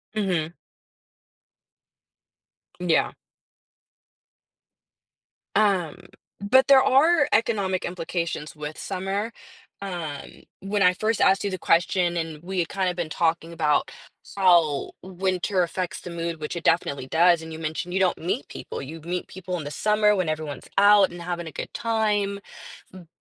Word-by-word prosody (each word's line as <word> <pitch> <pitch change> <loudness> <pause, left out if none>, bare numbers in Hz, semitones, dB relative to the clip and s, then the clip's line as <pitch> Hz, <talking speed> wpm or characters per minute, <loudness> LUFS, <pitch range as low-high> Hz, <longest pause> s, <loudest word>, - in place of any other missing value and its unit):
Mhm. 175 -6 -1 2.3
Yeah. - - +2 2.4
Um, 190 -7 +2 0.4
but 250 +7 +4
there 270 -1 +7
are 290 +3 +4
economic 200 -5 +1
implications 170 -4 -4
with 150 0 -7
summer. 195 +3 -3 0.5
Um, 170 -7 -6 0.2
when 200 +1 -1
I 180 -1 +5
first 215 +4 -1
asked 195 +1 +4
you 200 - -1
the 185 - -3
question 175 +1 +2
and 160 -2 -4
we 190 +1 -3
had 170 - 0
kinda 190 -2 -1
been 175 -3 -3
talking 165 +1 -1
about 155 -3 +1 0.4
how 170 -7 +3
winter 185 0 -1
affects 180 +1 -4
the - - -8
mood, 170 -1 -4
which 150 +3 -5
it 170 - -5
definitely 140 -5 +1
does, 170 +2 +4
and 160 0 -9
you 160 - -7
mentioned 160 +3 -4
you 190 - +1
don't 185 -2 +2
meet 165 -3 -3
people. - - -7
You 155 +4 -8
meet 175 +3 -4
people 180 -1 -5
in 160 - -5
the 145 - -6
summer 210 +4 +2
when 185 -4 0
everyone's 155 -3 -5
out 200 -2 +6
and 175 - -9
having 175 -1 -4
a - - -7
good - - -7
time. 210 -3 0 0.5
M 180 -3 -12
180 Hz, 145 wpm, -24 LUFS, 165-195 Hz, 2.4 s, there